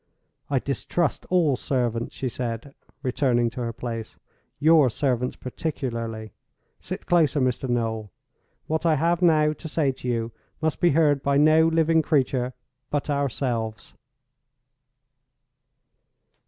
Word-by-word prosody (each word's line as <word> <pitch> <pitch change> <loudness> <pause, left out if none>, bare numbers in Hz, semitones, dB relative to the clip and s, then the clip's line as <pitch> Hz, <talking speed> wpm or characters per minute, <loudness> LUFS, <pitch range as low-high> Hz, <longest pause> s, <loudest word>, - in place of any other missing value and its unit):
"I 140 - +1
distrust 140 +6 -1
all 170 -7 +3
servants," 120 -3 -2
she 130 - -3
said, 120 +2 -4 0.3
returning 125 -3 +1
to 125 - -6
her 115 -1 -2
place—"your 125 +6 0
servants 125 0 -1
particularly. 115 - -4 0.5
Sit - - -6
closer, 160 -4 +3
Mr. 130 0 0
Noel. 110 -4 -1 0.5
What 160 0 -1
I 165 -2 +3
have 170 +4 +1
now 155 -3 +4
to 155 - -9
say 150 -3 +1
to 130 -1 -9
you 115 -1 -1 0.3
must 160 -2 -1
be 175 - +4
heard 145 -3 +3
by 140 0 +2
no 155 +2 +5
living 165 0 +3
creature 130 -5 +1 0.4
but 145 0 -1
ourselves." 120 -5 -2
135 Hz, 120 wpm, -25 LUFS, 120-155 Hz, 0.5 s, no